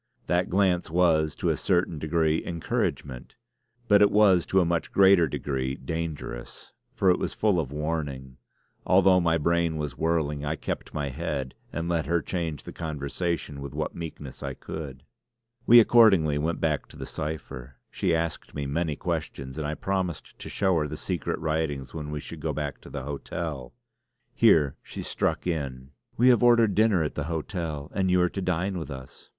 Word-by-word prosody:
That 90 +2 +1
glance 90 -2 +2
was 80 -3 +2
to - - -1
a - - +2
certain 85 -3 0
degree 80 0 +1
encouragement; 70 -6 -3 0.5
but 100 -1 +6
it 105 - +7
was 100 -5 +4
to 95 - +3
a 90 - +3
much 85 0 -1
greater 95 -4 +6
degree 65 -2 -2
dangerous, 75 -4 -6 0.2
for 95 - +4
it 90 - +1
was - - -3
full 105 -5 +2
of 70 -5 -3
warning. 75 -4 -4 0.5
Although 95 0 +5
my 85 -1 +2
brain 85 0 +1
was 75 -2 -4
whirling, 80 -3 0
I 75 +2 -1
kept - - -5
my 75 -2 -1
head 65 0 -3 0.2
and 85 +2 -3
let 85 -2 0
her 85 +1 +2
change 80 -2 -3
the - - -9
conversation 75 -1 -3
with 70 -1 -7
what - - -2
meekness 75 -5 -8
I - - -4
could. 70 -4 -7 0.6
We 120 +1 +10
accordingly 95 -11 +5
went 80 +3 -1
back 75 -4 0
to - - -14
the - - -6
cipher. 70 -5 -6 0.2
She 85 - +1
asked 80 0 -3
me 70 -1 -3
many 75 +2 -1
questions, 65 -1 -4
and 75 - -2
I 75 - -2
promised 95 -4 -3
to - - -7
show 95 -3 +1
her 75 - -1
the 75 +1 -6
secret 90 +1 -2
writings 75 -4 -2
when 75 -2 -5
we 75 0 -3
should - - -8
go - - -2
back - - -4
to - - -12
the 70 -2 -5
hotel. 70 -1 -5 0.6
Here 75 - +4
she - - -7
struck - - -1
in: 70 -6 -3 0.3
"We 125 +2 +6
have 120 -4 +5
ordered 120 -4 +5
dinner 105 -4 +3
at 75 - -3
the 75 - -3
hotel; 80 -2 -4
and 95 -1 +1
you 90 0 +4
are 90 - +3
to 95 - -4
dine 90 +1 -1
with 80 - -6
us." 65 -2 -10
80 Hz, 185 wpm, -27 LUFS, 75-90 Hz, 0.6 s, We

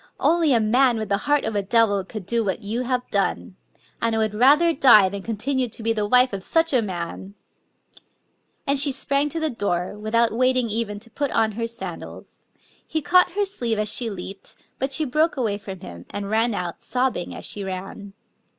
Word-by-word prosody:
Only 330 -3 +3
a 240 - +4
man 240 +3 +3
with 215 -2 -4
the 200 - +2
heart 295 -1 +3
of 220 - -3
a 205 - +1
devil 205 -1 +2
could 195 0 -8
do 230 +3 0
what 195 -1 -3
you 220 +4 -2
have 250 0 -2
done!... 200 -1 -1 0.5
And 230 -1 0
I - - 0
would 220 -1 0
rather 290 +9 +4
die 235 -9 +6
than 200 +1 -6
continue 245 +4 -2
to 220 - -10
be 225 0 +1
the 210 -2 -1
wife 250 +1 +4
of 195 - -4
such 325 - +1
a 250 - +4
man! 190 0 -6 0.6
" - - -45
And 280 0 +3
she 280 0 +7
sprang 275 +2 0
to 330 - -3
the 315 -1 -1
door, 190 -5 -2
without 225 +2 +1
waiting 255 0 +1
even 210 -2 -2
to 230 0 -13
put 285 +3 -2
on 225 -2 +1
her 230 +2 -3
sandals. 230 0 -9 0.4
He 315 -2 -2
caught 360 +2 +4
her 410 +1 0
sleeve 240 - -1
as 210 0 +1
she 235 -2 0
leaped; 195 0 -8 0.2
but 270 +1 -1
she 310 +3 0
broke 305 +4 +1
away 215 -5 -1
from 195 -3 -9
him, 85 0 -10
and 205 0 -5
ran 225 0 +2
out, 175 -2 -5
sobbing 250 -8 -2
as - - -6
she 205 - -2
ran. 195 +1 -7
230 Hz, 210 wpm, -23 LUFS, 205-265 Hz, 0.6 s, she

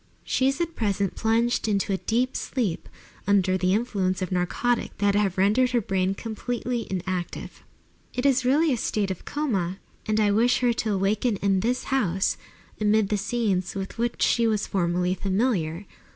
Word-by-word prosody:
She 260 - +1
is 275 +3 0
at 335 -1 -2
present 200 -3 0
plunged 230 +1 +1
into 200 -1 0
a - - +1
deep 245 +6 0
sleep, 220 -11 -2 0.4
under 195 -2 +3
the 185 0 +1
influence 200 -5 0
of 185 - -5
narcotics 185 +7 0
that 205 -1 +2
have 200 -2 +1
rendered 210 +7 +3
her 240 - +4
brain 190 -2 0
absolutely 240 +1 -3
inactive. 185 -1 -4 0.5
It 250 - -3
is 260 -2 +3
really 285 +4 +3
a - - 0
state 205 -3 -1
of 185 - -7
coma, 195 - -1 0.3
and 215 0 +1
I 210 -1 +3
wish 235 +5 +3
her 245 -1 +3
to 215 -3 -1
waken 210 +4 +1
in 195 -1 +1
this 245 +6 0
house, 190 -7 +1 0.4
amid 210 -1 +2
the 210 - +1
scenes 200 -5 -1
with 195 +3 -5
which 235 0 0
she 235 -1 +3
was 215 -2 0
formerly 180 -1 0
familiar. 190 -3 -1
210 Hz, 170 wpm, -25 LUFS, 190-240 Hz, 0.5 s, her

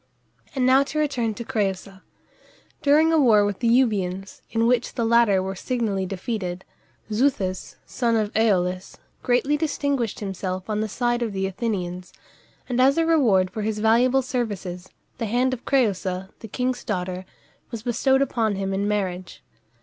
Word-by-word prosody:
And 260 -2 +1
now 260 +1 +6
to 305 - -5
return 250 -8 0
to 235 - -7
Crëusa. 195 -5 -3 0.8
During 310 +3 +4
a 320 - +4
war 215 -7 +5
with 205 -2 -3
the 235 - 0
Euboeans, 195 -6 0
in 225 0 +1
which 245 0 +1
the 235 - 0
latter 225 -5 +4
were 190 0 -3
signally 205 -3 -2
defeated, 185 -2 -4 0.5
Xuthus, 210 -6 0
son 235 -3 0
of 215 -2 0
Æolus, 185 -4 +1 0.3
greatly 270 +4 +1
distinguished 285 -7 -1
himself 185 -2 -4
on 210 0 0
the 215 - -2
side 240 +2 0
of 225 -3 -2
the 190 0 -1
Athenians, 185 -3 -4 0.5
and 250 0 +1
as 275 +3 +4
a 330 - +3
reward 225 - +3
for 220 - -4
his 215 0 -2
valuable 245 +5 +3
services, 200 -8 -4 0.3
the 230 - -2
hand 250 +4 +1
of 250 - -7
Crëusa, 190 -7 0
the 225 - -9
king's 250 +3 -2
daughter, 185 -4 -3 0.5
was 230 -3 -7
bestowed 265 +3 +2
upon 225 -6 0
him 195 0 -2
in 200 +1 -1
marriage. 185 -3 -3
220 Hz, 160 wpm, -24 LUFS, 190-250 Hz, 0.8 s, now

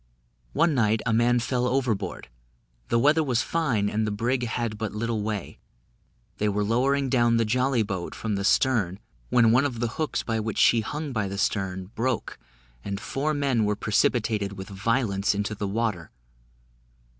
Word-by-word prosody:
One 165 +2 +3
night, 110 -4 +2
a 115 - +1
man 120 +2 +3
fell 125 +1 0
overboard 120 -8 -1 0.6
the 115 - +2
weather 150 +6 +4
was 125 -4 +1
fine, 130 -12 0
and 110 +1 0
the - - -1
brig 120 +4 -1
had 115 -2 -3
but 110 -2 -3
little 115 0 -1
way; 105 -3 -4 0.8
they 105 - +1
were 105 +1 0
lowering 135 +6 +1
down 120 -2 +3
the 115 - +2
jolly 125 +1 +1
boat 95 -4 -4
from 110 -2 -3
the 100 0 -1
stern, 105 -4 +2 0.3
when 115 -2 +5
one 125 +4 +4
of 130 -5 -2
the 120 -1 0
hooks 155 - -1
by 115 -1 -1
which 110 -1 -3
she 115 - +5
hung 150 +6 -4
by 105 -4 -1
the 100 +1 -5
stern, 95 -2 -2
broke, 120 +1 -2 0.4
and 100 -1 -4
four 150 +7 -2
men 135 -6 +1
were 105 0 +1
precipitated 105 -1 +1
with 95 0 -8
violence 100 0 0
into 105 +1 -2
the 105 -1 -3
water. 105 -5 -2
115 Hz, 175 wpm, -26 LUFS, 105-125 Hz, 0.8 s, when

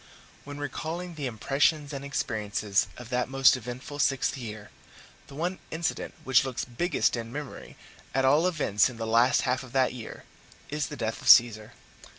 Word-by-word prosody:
When 145 0 -8
recalling 160 +5 -5
the 145 -4 -4
impressions 145 +5 0
and 140 0 -5
experiences 105 -6 -1
of 125 -1 -10
that 125 0 -1
most 135 -1 +5
eventful 130 +4 -7
sixth 135 -1 +1
year, 110 -5 -8 0.6
the 140 - -12
one 175 +5 -2
incident 165 +1 -3
which 130 -1 +4
looks 130 -2 -3
biggest 140 +6 0
in 115 -1 -6
memory, 145 0 -8 0.3
at 135 0 +1
all 150 +6 +4
events 130 - +2
in 125 - -10
the 115 - -4
last 115 +3 +4
half 125 0 0
of 130 -2 -12
that 130 -1 +2
year, 120 -3 -9 0.5
is 150 0 -2
the 150 - -8
death 115 -2 -3
of - - -1
Caesar. 110 -3 +6
130 Hz, 170 wpm, -27 LUFS, 115-145 Hz, 0.6 s, Caesar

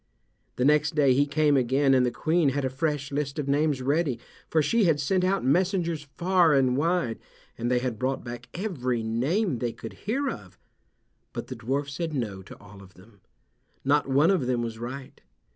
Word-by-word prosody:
The 125 - 0
next 150 +1 +3
day 140 -4 +4
he 140 +3 +2
came 150 0 +2
again 135 +2 +3
and 130 -1 +4
the 125 - +2
Queen 160 +3 +1
had 135 0 -1
a 130 - -1
fresh 145 0 -2
list 140 0 -2
of 145 -2 -3
names 145 -1 +1
ready, 145 -2 +1 0.3
for 160 - +2
she 220 +8 +2
had 160 -4 +3
sent 180 +6 +1
out 195 -2 +1
messengers 170 0 +1
far 175 -3 +4
and 130 -2 +3
wide, 160 -5 0 0.4
and 120 +1 -2
they 125 - +2
had 125 -3 -2
brought 130 +1 -1
back 120 0 -8
every 130 - -2
name 130 - 0
they 120 -1 -2
could 115 - -9
hear 270 +8 -2
of. 95 - -7 0.8
But - - -6
the 130 - -5
dwarf 135 +5 -2
said 155 +2 -4
no 105 -7 -3
to 95 - -12
all 100 -1 -14
of 95 -1 -16
them. 100 +2 -19 0.6
Not 145 0 +2
one 145 +7 +4
of 165 -10 +1
them 120 -2 0
was 115 -1 -5
right. 130 +3 -7
140 Hz, 195 wpm, -26 LUFS, 125-160 Hz, 0.8 s, day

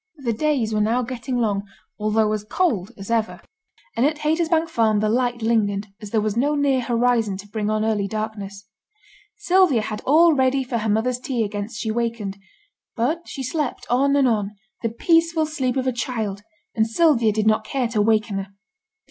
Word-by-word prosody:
The 250 -5 -2
days 245 -3 0
were 210 - +1
now 230 +4 +1
getting 245 +1 -4
long, 210 -4 +1 0.4
although 215 0 +1
as 210 -1 -3
cold 215 - 0
as 195 +3 -7
ever; 225 -1 0 0.6
and 235 - +1
at 300 +2 +2
Haytersbank 320 +2 +1
Farm 220 -6 +2
the 215 - +1
light 240 0 0
lingered, 210 -3 +1
as 210 - -7
there 220 0 +1
was 215 -1 -1
no 285 +5 +1
near 280 -3 +2
horizon 235 -4 +1
to 200 +1 -10
bring 210 0 -3
on 215 0 0
early 210 -3 0
darkness. 205 -2 -5 0.7
Sylvia 365 - +3
had 215 -1 -5
all 325 +4 +5
ready 265 -1 +2
for 245 -2 -2
her 220 0 -2
mother's 235 +4 +1
tea 250 -2 -1
against 210 +2 -5
she 220 - -1
wakened; 225 -4 -3 0.6
but 305 +9 -1
she 270 - -6
slept 290 +1 -3
on 275 +3 +3
and 275 -2 +4
on, 210 -3 -1 0.3
the 230 - 0
peaceful 330 +6 +2
sleep 270 -4 -2
of 260 - 0
a 260 - +1
child, 225 -5 -3 0.3
and 220 0 +1
Sylvia 235 -3 +3
did 215 0 -1
not 215 0 +3
care 250 +3 -1
to 220 -3 +1
waken 215 -1 +1
her. 195 - -5
230 Hz, 190 wpm, -22 LUFS, 215-265 Hz, 0.7 s, all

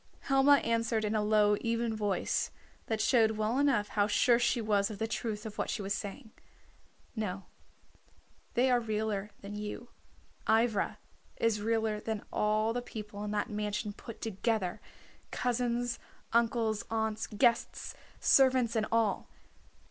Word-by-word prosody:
Helma 270 +1 +5
answered 230 -1 +1
in 210 - -1
a 215 - +2
low 210 0 +4
even 230 0 0
voice, 205 -3 0 0.4
that 220 -1 -1
showed 220 -1 +3
well 215 +4 0
enough 270 -8 +2
how 205 -1 +2
sure 235 +3 +4
she 240 0 +2
was 205 -3 +1
of 215 - -6
the 220 - -1
truth 220 -1 -3
of 210 -1 -7
what - - -1
she 205 - -2
was 195 +1 -1
saying 220 +4 -6 0.8
"No, 200 -3 -3 1.1
they 255 +2 +4
are 245 - +4
realer 215 -3 -2
than 200 +1 -7
you. 210 +3 -6 0.6
Ivra 225 -2 +2 0.4
is 220 -2 +1
realer 220 -1 0
than 220 -1 -4
all 215 +1 +1
the 245 - -2
people 210 -3 -7
in 210 - -3
that 205 0 -1
mansion 210 0 -2
put 230 +2 -10
together, 215 -2 -1 0.5
cousins, 245 -1 -1 0.3
uncles, 230 -2 +2
aunts, 220 -1 -1
guests, 235 +2 +1 0.3
servants 255 -3 +4
and 215 -1 +1
all. 225 -2 +1
220 Hz, 145 wpm, -31 LUFS, 210-235 Hz, 1.1 s, Helma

